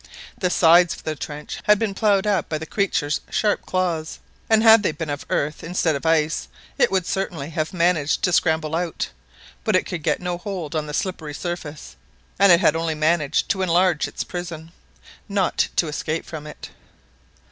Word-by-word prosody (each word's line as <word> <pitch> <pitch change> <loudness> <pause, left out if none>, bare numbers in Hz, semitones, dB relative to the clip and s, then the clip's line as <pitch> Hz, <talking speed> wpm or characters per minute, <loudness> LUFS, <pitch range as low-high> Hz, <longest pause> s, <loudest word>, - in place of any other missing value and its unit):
The 180 - -1
sides 175 0 +5
of - - -14
the 155 - -3
trench 150 +1 -7
had 210 0 +5
been 215 -2 -1
ploughed 200 -1 +2
up 200 -4 0
by 155 - -1
the 160 - -6
creature's 160 -6 -1
sharp 210 -1 0
claws, 170 -4 -1 0.3
and 220 0 +4
had 225 -1 +8
they 190 - +1
been 155 0 -6
made - - 0
of 145 - -8
earth 150 +1 -1
instead 165 -2 0
of 140 +3 -3
ice, 160 -1 +1 0.3
it - - +4
would 190 -3 +1
certainly 165 -7 -3
have 155 0 -2
managed 170 -4 +1
to 180 - +2
scramble 160 -2 +1
out, 170 -1 -2 0.5
but - - +1
it - - +2
could 175 -3 -5
get 150 0 0
no 180 -1 -3
hold 180 -6 -5
on 155 -1 -1
the 150 - -4
slippery 160 -6 -3
surface, 170 -4 -6 0.4
and 200 -1 +7
it 170 +1 +6
had 160 -4 +4
only 165 -1 -1
managed 155 -1 +1
to 190 - 0
enlarge 180 -2 +2
its - - -5
prison, 165 -2 -7 0.6
not 200 -3 +1
to 170 - +2
escape 155 +2 -3
from 155 -2 -8
it. 150 - -10
165 Hz, 190 wpm, -22 LUFS, 155-185 Hz, 0.6 s, had